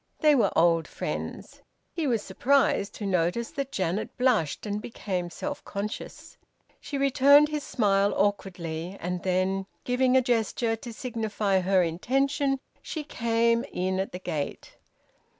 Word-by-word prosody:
They 305 -1 +5
were 260 - +3
old 165 -1 +3
friends. - - -5 0.3
He 325 -4 -1
was 230 -5 +1
surprised 270 -6 +1
to 210 - -5
notice 185 +5 0
that 275 -1 -4
Janet 190 -3 -2
blushed 235 - +1
and 210 0 -2
became 185 -6 -4
self 290 +10 -5
conscious. 205 +2 -6 0.4
She 285 - -5
returned 275 +2 +6
his 300 -1 -3
smile 200 -3 +2
awkwardly, 180 -3 -2
and 180 +1 -3
then, 190 +1 0 0.2
giving 255 +1 +3
a - - +5
gesture 230 -1 +1
to 235 +2 -9
signify 220 -5 -1
her 185 0 +3
intention, 270 - 0 0.2
she 310 - -5
came 230 -3 +1
in 185 +1 -1
at 190 - -2
the - - -5
gate. 155 -5 -5
215 Hz, 140 wpm, -27 LUFS, 185-260 Hz, 0.4 s, returned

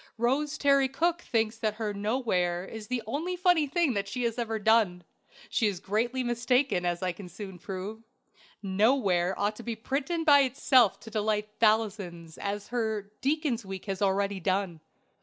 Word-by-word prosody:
Rose 280 +6 0
Terry 275 -2 +3
Cooke 340 +5 0
thinks 225 -4 -1
her 215 -1 -2
"Knoware" 205 -2 -1
the 250 -2 -2
only 315 - -2
funny 355 -4 +3
thing 300 -4 +1
she 245 +5 -4
has 235 0 -1
ever 225 -2 -1
done. 210 -5 +3 0.4
She 225 - +1
is 195 -4 -2
greatly 235 +7 -1
mistaken, 240 -5 +1
as 175 +1 -2
I 185 - +1
can 180 +1 -10
soon 190 -2 -9
prove. 195 +5 -6 0.6
"Knoware" 195 -3 +2
ought 205 +1 0
to 235 - -9
be 235 -1 -3
printed 280 +8 -2
by 290 -3 +7
itself 255 -4 +3
to 225 - -11
delight 210 -1 0
thousands, 200 -7 0
as 200 0 -4
her 220 -4 -2
"Deacon's 275 -4 0
Week" 190 -1 -7
has 195 -1 -4
already 200 0 +1
done. 185 -2 -1
220 Hz, 160 wpm, -28 LUFS, 195-255 Hz, 0.6 s, by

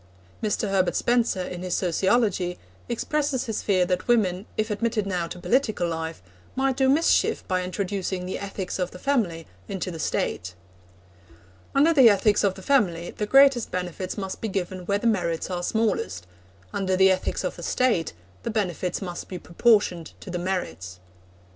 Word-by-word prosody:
Mr. 215 0 0
Herbert 190 -2 +1
Spencer, 235 -6 +1
in 180 -1 -6
his 180 -1 -1
Sociology, 185 0 +1 0.3
expresses 275 +2 -1
his 220 -3 -2
fear 185 -3 +2
that 180 0 -1
women, 200 -5 +2
if 215 0 0
admitted 220 0 0
now 180 -3 -1
to 180 - -8
political 215 -3 +1
life, 160 - -4 0.3
might 265 0 +1
do 265 0 +3
mischief 310 +5 +2
by 185 -1 +1
introducing 185 0 -3
the 185 - -4
ethics 195 -1 -4
of 180 -1 0
the - - -11
family 180 - 0 0.2
into 190 -1 -3
the 165 - -7
State. 90 - -2 1.2
'Under 300 +4 +5
the 265 -6 +8
ethics 205 0 +3
of 195 -2 +2
the 190 - -11
family 180 -11 +1
the 210 - -4
greatest 270 -2 +5
benefits 180 +1 -4
must 190 -2 -5
be 225 - -1
given 185 -2 -4
where 200 - +2
the 205 - -6
merits 180 -6 0
are 175 -1 -2
smallest; 195 - -1 0.5
under 190 -1 0
the 190 0 +6
ethics 185 0 -1
of - - -2
the - - -10
State 235 -11 +1 0.3
the - - -4
benefits 190 -4 -2
must 175 -2 -6
be 185 - -6
proportioned 180 -3 +2
to 185 - -9
the 175 - -2
merits.' 95 - -4
190 Hz, 170 wpm, -25 LUFS, 180-225 Hz, 1.2 s, the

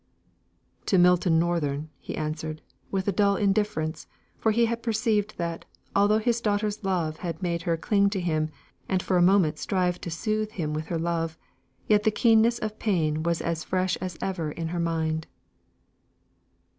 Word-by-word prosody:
"To 190 - +3
Milton 175 -1 +4
Northern," 155 -3 0
he - - -6
answered, 155 0 -4 0.3
with 190 0 -2
a - - +3
dull 200 +1 +3
indifference, 195 -6 0 0.3
for 220 - +1
he 235 +2 +3
had 230 0 -2
perceived 220 -2 0
that, 170 -1 -3 0.3
although 205 +2 +4
his 235 +1 0
daughter's 210 0 -1
love 170 -5 -1
had 170 0 -5
made 170 -1 -1
her 165 - +2
cling 200 +4 +2
to 200 -1 -2
him, 155 -3 0 0.4
and 185 -2 +1
for 185 - 0
a - - +4
moment 180 -3 +4
strive 180 -2 0
to - - -5
soothe 215 +5 -2
him 155 -4 -2
with 155 0 -3
her 170 - -1
love, 165 -1 -2 0.5
yet 210 -1 +4
the 220 - +3
keenness 225 +1 +4
of 215 -2 -3
the 215 - -27
pain 160 -8 0
was 170 +1 0
as 165 -1 -2
fresh 185 0 0
as 180 -2 -5
ever 170 -5 -2
in 165 +1 -4
her 175 +1 -3
mind. 160 -1 -1
180 Hz, 175 wpm, -26 LUFS, 165-210 Hz, 0.5 s, Milton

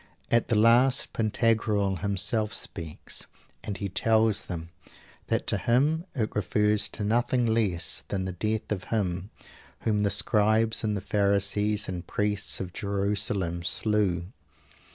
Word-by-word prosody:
At 115 0 +3
the 115 - +1
last 120 +5 +4
Pantagruel 110 -3 +1
himself 100 +2 +1
speaks; 80 -5 -3 0.4
and 105 -1 -4
he 100 - -3
tells 110 +1 +2
them 85 -2 -6 0.6
that - - 0
to - - +1
him 150 +8 +2
it 110 -5 -2
refers 105 +1 +1
to 105 - -6
nothing 120 +3 +1
less 105 -7 0
than 95 -2 -2
the 95 - -3
death 110 +5 -3
of 95 -4 -2
Him 95 -3 -2 0.5
whom 105 -2 +1
the 105 -1 +2
Scribes 110 +2 +3
and 105 -2 0
Pharisees 100 +1 +1
and 90 -2 -5
Priests 105 -1 -1
of 90 -2 -5
Jerusalem 100 -3 -1
slew. 95 -2 0
105 Hz, 130 wpm, -27 LUFS, 95-110 Hz, 0.6 s, last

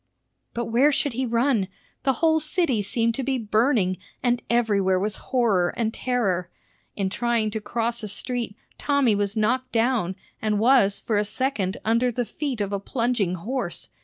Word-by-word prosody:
But 235 0 -1
where 250 +7 +4
should 285 -2 0
he 255 +2 -1
run? 235 -3 +2 0.4
The 270 - +4
whole 320 0 +4
city 305 - +1
seemed 230 +3 0
to 265 - -3
be 265 0 0
burning, 215 -4 +2 0.3
and 245 -1 +2
everywhere 200 -6 +2
was 210 +2 -2
horror 215 -9 +2
and 225 -1 0
terror. 205 -10 -1 0.5
In 195 -2 0
trying 235 -1 0
to 220 0 -3
cross 235 +2 -2
a 215 - -4
street, 235 +1 -3 0.2
Tommy 280 -6 +3
was 205 +1 -1
knocked 255 +4 +1
down, 225 -6 +1 0.3
and 215 -1 +1
was 220 -3 +4
for 215 -3 0
a - - +2
second 210 -3 -1
under 230 +3 +2
the 245 +1 -2
feet 265 -3 -3
of 200 0 -2
a 200 - 0
plunging 230 -4 0
horse. 210 0 -4
230 Hz, 170 wpm, -24 LUFS, 205-255 Hz, 0.5 s, where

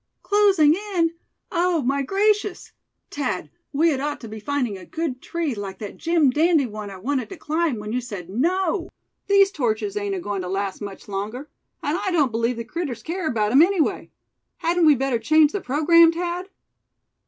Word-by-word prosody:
"Closing 395 -7 +4 0.2
in! 330 -1 +2 0.4
Oh! 345 -3 +1
my 275 +3 +1
gracious! 410 +5 0 0.4
Thad, 210 - -3 0.2
we 320 +4 +3
had 280 -4 0
ought 290 +1 -3
to 230 - -8
be 220 0 -8
finding 250 -2 -2
a 190 - -10
good 275 - -4
tree 335 -5 -2
like 200 -3 -6
that 205 -1 -7
Jim 330 -5 +2
dandy 315 0 +3
one 215 -3 -7
I 195 - -9
wanted 255 +5 -2
to 385 - -8
climb, 315 -4 -1
when 210 +1 -5
you 250 - 0
said 205 -8 -7
no. 340 - 0 0.4
These 395 -1 +5
torches 275 - -1
ain't 405 -1 -2
agoin' 205 - -3
to 180 - -5
last 195 +1 -3
much 200 -1 -8
longer; 210 +8 -5 0.3
and 300 +5 0
I - - -1
don't 300 -8 +2
believe 230 +2 0
the 230 - -3
critters 280 -1 -4
care 340 0 -3
about 215 -6 0
'em 270 +5 +7
anyway. 355 -2 +1 0.5
Hadn't 340 -1 +2
we 300 - +7
better 265 -2 0
change 310 +5 +4
the 405 - -3
programme, 325 +4 +5
Thad?" 350 +2 -4
290 Hz, 185 wpm, -23 LUFS, 230-340 Hz, 0.5 s, em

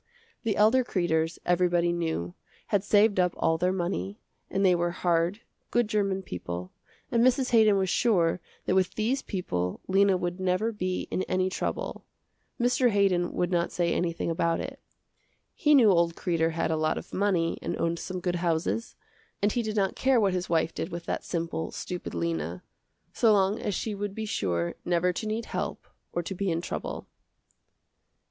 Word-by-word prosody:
The 220 -4 0
elder 225 +5 +4
Kreders, 165 -6 0
everybody 175 -1 +2
knew, 160 - -2 0.4
had 205 -4 +2
saved 205 -1 +4
up 180 -1 +2
all 165 0 +1
their 180 +2 +2
money, 170 - -3 0.3
and 195 +1 +1
they 185 - +6
were 175 0 +1
hard, 175 +3 0 0.3
good 240 -2 +2
german 195 -3 0
people, 90 - -6 0.4
and 235 -1 +3
Mrs. 255 +1 +3
Haydon 215 -3 +5
was 190 -1 +1
sure 180 -4 +2 0.2
that - - +1
with 185 -1 +2
these 240 +6 0
people 90 - -3
Lena 195 0 +4
would 175 0 -3
never 185 +4 +1
be 185 -4 -3
in - - 0
any 185 0 +1
trouble. - - -3 0.6
Mr. 245 +1 +3
Haydon 195 -4 +2
would 180 0 0
not 170 -1 +1
say 170 -1 0
anything 170 -1 -1
about 165 0 +1
it. - - -6 0.7
He 300 -1 +4
knew 230 -7 +7
old 170 -2 +2
Kreder 165 -2 0
had 165 0 0
a 160 - +1
lot 155 0 +1
of - - -8
money 185 -4 +1
and - - -3
owned 170 0 0
some 185 -1 -4
good 175 0 -1
houses, 170 +6 -1 0.4
and 205 +1 +2
he 240 - 0
did 220 -1 -3
not 195 -2 +1
care 260 -2 +3
what 200 -4 +2
his 180 -1 -2
wife 165 -1 +1
did 165 - -4
with 170 -1 -6
that - - -2
simple, 165 -1 -3
stupid 180 - -6
Lena, 85 +1 -2 0.5
so 225 - +4
long 200 0 +3
as 205 - -2
she 220 - -2
would 200 0 -4
be 220 - -3
sure 85 - -1
never 175 +1 +1
to 215 - -4
need 220 +2 -2
help - - -4 0.3
or 175 - -2
to 190 - -4
be 195 +1 -2
in 165 -1 0
trouble. 170 - -5
180 Hz, 180 wpm, -28 LUFS, 170-205 Hz, 0.7 s, knew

